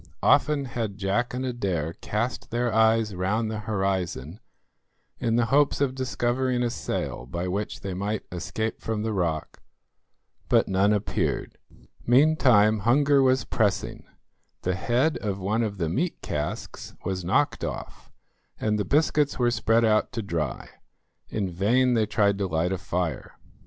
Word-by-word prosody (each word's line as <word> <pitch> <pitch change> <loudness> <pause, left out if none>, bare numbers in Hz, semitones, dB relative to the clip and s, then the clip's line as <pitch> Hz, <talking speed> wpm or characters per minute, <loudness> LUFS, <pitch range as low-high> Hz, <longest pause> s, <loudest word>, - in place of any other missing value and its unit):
Often 150 -2 +3
had 110 -4 -3
Jack 100 +5 0
and 130 +1 -3
Adair 95 -11 -2
cast 115 +8 -3
their 120 0 -1
eyes 110 -1 +3
round 105 +5 -1
the 110 - -3
horizon 95 - -2 0.8
in 115 -2 +1
the 120 -1 +3
hopes 145 0 +4
of 140 -2 +1
discovering 125 -1 0
a 120 - 0
sail - - -4
by 85 +6 -3
which 100 +3 -3
they 95 -2 -4
might 100 +3 -3
escape 110 +5 -3
from 110 -2 -2
the 110 0 -1
rock, 85 -5 -2 0.9
but - - +4
none 95 +2 +3
appeared. 105 -1 -1 0.5
Meantime 120 -6 +5
hunger 140 +6 +4
was 130 0 +3
pressing; 105 -2 -1 0.6
the 90 - 0
head 120 - +1
of 100 -3 -2
one 100 +4 0
of 105 -3 -2
the 85 -3 -1
meat 155 - -1
casks 75 0 -5
was 95 0 -2
knocked 85 - +1
off, - - -6 0.5
and 105 -1 0
the - - +1
biscuits 150 -1 +2
were 120 -1 +2
spread 115 0 +2
out 110 -1 +2
to 115 -3 -3
dry. 80 -8 -3 0.6
In 105 -3 -2
vain 120 +8 +2
they 110 -2 +2
tried 100 -1 +2
to 100 - 0
light 85 +1 0
a 95 - -2
fire. 90 -6 -3
110 Hz, 150 wpm, -26 LUFS, 95-120 Hz, 0.9 s, Meantime